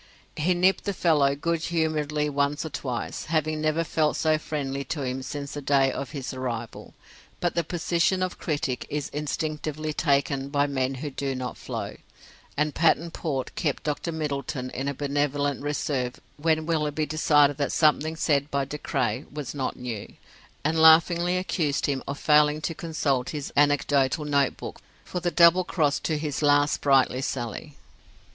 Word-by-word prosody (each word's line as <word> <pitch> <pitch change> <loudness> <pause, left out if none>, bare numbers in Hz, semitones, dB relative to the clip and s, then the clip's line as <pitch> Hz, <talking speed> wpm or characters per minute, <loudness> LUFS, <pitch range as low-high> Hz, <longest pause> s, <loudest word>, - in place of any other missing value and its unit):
He 175 +4 +1
nipped 185 +2 +2
the 200 - -1
fellow 145 -6 +3
good 165 +2 -1
humouredly 155 -3 0
once 145 +2 0
or 160 - -5
twice, 125 -4 -4
having 155 -1 0
never 155 +2 +1
felt 155 -1 0
so 155 -1 +2
friendly 140 -3 -3
to 145 +2 -3
him 130 0 -3
since 140 +2 -5
the 145 - -5
day 135 -1 +3
of 135 -1 -5
his 135 -4 -5
arrival; 120 -3 -5 0.4
but 175 - 0
the 170 - +1
position 175 +2 +1
of 185 - -4
critic 145 -5 -2
is 150 -1 -3
instinctively 155 +1 -3
taken 140 -2 +1
by 145 0 +2
men 135 -2 -1
who 145 - -3
do 135 0 -3
not 125 -1 -4
flow: - - -6 0.6
and 150 0 +1
Patterne 165 0 +2
Port 140 -6 -3
kept 145 -4 -2
Dr 150 +3 -2
Middleton 140 -4 -3
in 135 +2 -4
a 140 - -2
benevolent 145 0 -1
reserve 140 -3 -2 0.2
when 155 +1 +1
Willoughby 155 -2 0
decided 145 -2 +3
that 140 -2 -1
something 155 0 +2
said 145 -3 +1
by 140 -1 0
De 150 +2 -6
Craye 120 0 -1
was 150 -2 -5
not 135 -3 -3
new, 120 -5 -6 0.5
and 160 +2 +1
laughingly 170 +2 +6
accused 165 -6 0
him 135 -2 -1
of 140 - -3
failing 150 0 +4
to 165 - -2
consult 155 -7 -1
his 150 -3 -5
anecdotal 145 0 +2
notebook 140 -2 -1 0.3
for 180 - -4
the 175 0 0
double 170 +2 +6
cross 155 -5 +1
to 155 - -1
his 150 -1 -3
last 145 0 +4
sprightly 135 -2 +3
sally. 130 +3 -4
145 Hz, 165 wpm, -26 LUFS, 140-160 Hz, 0.6 s, laughingly